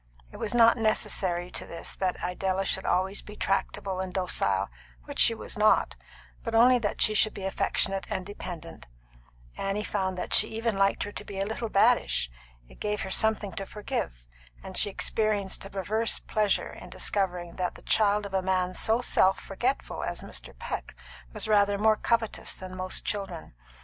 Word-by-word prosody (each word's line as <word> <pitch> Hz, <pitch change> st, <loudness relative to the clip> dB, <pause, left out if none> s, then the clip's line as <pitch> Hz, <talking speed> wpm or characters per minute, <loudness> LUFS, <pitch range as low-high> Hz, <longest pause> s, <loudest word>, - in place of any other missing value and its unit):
It -, -, -10 dB
was 215 Hz, -, -2 dB
not 230 Hz, 0 st, +6 dB
necessary 185 Hz, -5 st, 0 dB
to -, -, -4 dB
this 170 Hz, -, -6 dB
that 185 Hz, -2 st, 0 dB
Idella 190 Hz, +1 st, -1 dB
should 190 Hz, -, -1 dB
be -, -, 0 dB
always 190 Hz, +2 st, +1 dB
tractable 195 Hz, -2 st, -2 dB
and 190 Hz, -1 st, -3 dB
docile, 180 Hz, -, 0 dB, 0.4 s
which -, -, -7 dB
she 230 Hz, -, +7 dB
was 220 Hz, -, -6 dB
not, 215 Hz, 0 st, +4 dB, 0.5 s
but 230 Hz, -1 st, -3 dB
only 245 Hz, +2 st, +6 dB
that 205 Hz, -3 st, +1 dB
she 215 Hz, -, +3 dB
should 215 Hz, 0 st, +3 dB
be 195 Hz, -, -6 dB
affectionate 195 Hz, 0 st, 0 dB
and 190 Hz, -4 st, -3 dB
dependent; 180 Hz, -, -8 dB, 0.7 s
Annie 195 Hz, +2 st, -1 dB
found 190 Hz, -3 st, -2 dB
that -, -, -3 dB
she 215 Hz, -, +6 dB
even 225 Hz, 0 st, -2 dB
liked 195 Hz, 0 st, +2 dB
her 205 Hz, -, -5 dB
to -, -, -7 dB
be 195 Hz, -1 st, -7 dB
a 195 Hz, -, +1 dB
little 220 Hz, +2 st, -3 dB
baddish; 205 Hz, -, +3 dB, 0.4 s
it -, -, -17 dB
gave 210 Hz, 0 st, -1 dB
her 190 Hz, -, -4 dB
something 220 Hz, -1 st, +3 dB
to 195 Hz, +2 st, -5 dB
forgive; -, -, -4 dB, 0.4 s
and 190 Hz, -, -8 dB
she 205 Hz, -, +5 dB
experienced 205 Hz, -1 st, 0 dB
a -, -, -7 dB
perverse 215 Hz, +4 st, 0 dB
pleasure 210 Hz, -2 st, 0 dB
in -, -, -11 dB
discovering 180 Hz, -4 st, -2 dB
that 180 Hz, -1 st, -1 dB
the -, -, -14 dB
child 210 Hz, -1 st, +3 dB
of 200 Hz, -, -8 dB
a 190 Hz, -, +2 dB
man 185 Hz, -1 st, 0 dB
so 225 Hz, +5 st, +2 dB
self 190 Hz, -5 st, +3 dB
forgetful 245 Hz, +8 st, -2 dB
as -, -, -4 dB
Mr. -, -, -7 dB
Peck -, -, -5 dB, 0.4 s
was -, -, -4 dB
rather 205 Hz, -1 st, +4 dB
more 215 Hz, +1 st, +4 dB
covetous 230 Hz, 0 st, 0 dB
than 185 Hz, 0 st, -8 dB
most 185 Hz, 0 st, -3 dB
children. 195 Hz, -, -4 dB
200 Hz, 180 wpm, -28 LUFS, 185-215 Hz, 0.7 s, she